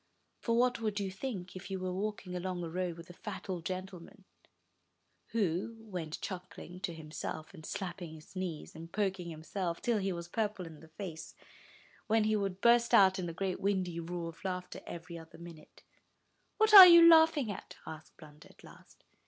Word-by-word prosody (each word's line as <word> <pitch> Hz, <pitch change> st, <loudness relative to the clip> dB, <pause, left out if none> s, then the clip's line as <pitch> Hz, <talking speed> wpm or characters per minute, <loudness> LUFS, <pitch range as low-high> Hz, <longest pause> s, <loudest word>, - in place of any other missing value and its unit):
For 230 Hz, -1 st, 0 dB
what 250 Hz, 0 st, +2 dB
would 210 Hz, -2 st, -1 dB
you 195 Hz, -2 st, -3 dB
think, 190 Hz, -4 st, -6 dB
if 185 Hz, +2 st, -8 dB
you 190 Hz, -, -3 dB
were 185 Hz, 0 st, -3 dB
walking 200 Hz, -1 st, -4 dB
along 180 Hz, 0 st, -3 dB
a 165 Hz, -, -4 dB
road 180 Hz, -1 st, -3 dB
with 170 Hz, +1 st, -11 dB
a -, -, -13 dB
fat 205 Hz, +2 st, -8 dB
old 180 Hz, -3 st, -4 dB
gentlemen, 185 Hz, +1 st, -7 dB, 1.0 s
who 200 Hz, 0 st, -1 dB
went 180 Hz, -8 st, -6 dB
chuckling 180 Hz, -1 st, -7 dB
to 175 Hz, -, -4 dB
himself, 155 Hz, +1 st, -7 dB
and 160 Hz, -4 st, -12 dB
slapping 175 Hz, -2 st, -6 dB
his 155 Hz, +4 st, -16 dB
knees, 180 Hz, -4 st, -5 dB
and 165 Hz, +1 st, -10 dB
poking 190 Hz, -4 st, -2 dB
himself, 170 Hz, +2 st, -4 dB
till 235 Hz, -3 st, 0 dB
he 195 Hz, 0 st, -1 dB
was 170 Hz, -1 st, -5 dB
purple 210 Hz, -1 st, -2 dB
in 160 Hz, -2 st, -11 dB
the 160 Hz, -, -15 dB
face, 160 Hz, -1 st, -8 dB, 0.7 s
when 220 Hz, 0 st, +3 dB
he 215 Hz, 0 st, +2 dB
would 195 Hz, -2 st, -2 dB
burst 235 Hz, +1 st, +5 dB
out 190 Hz, -1 st, +6 dB
in 175 Hz, -2 st, -3 dB
a -, -, -6 dB
great 185 Hz, +2 st, -3 dB
windy 185 Hz, -4 st, -1 dB
roar 170 Hz, 0 st, -4 dB
of 165 Hz, -, -14 dB
laughter 180 Hz, -1 st, -5 dB
every 170 Hz, 0 st, -8 dB
other 160 Hz, 0 st, -14 dB
minute? 170 Hz, -2 st, -13 dB, 0.7 s
'What 435 Hz, 0 st, +3 dB
are 385 Hz, -3 st, +14 dB
you 340 Hz, -1 st, +9 dB
laughing 320 Hz, -7 st, +6 dB
at?'' 195 Hz, -, -9 dB
asked 155 Hz, 0 st, -10 dB
Blunder, 150 Hz, -2 st, -15 dB
at -, -, -20 dB
last. -, -, -17 dB
185 Hz, 185 wpm, -32 LUFS, 170-205 Hz, 1.0 s, are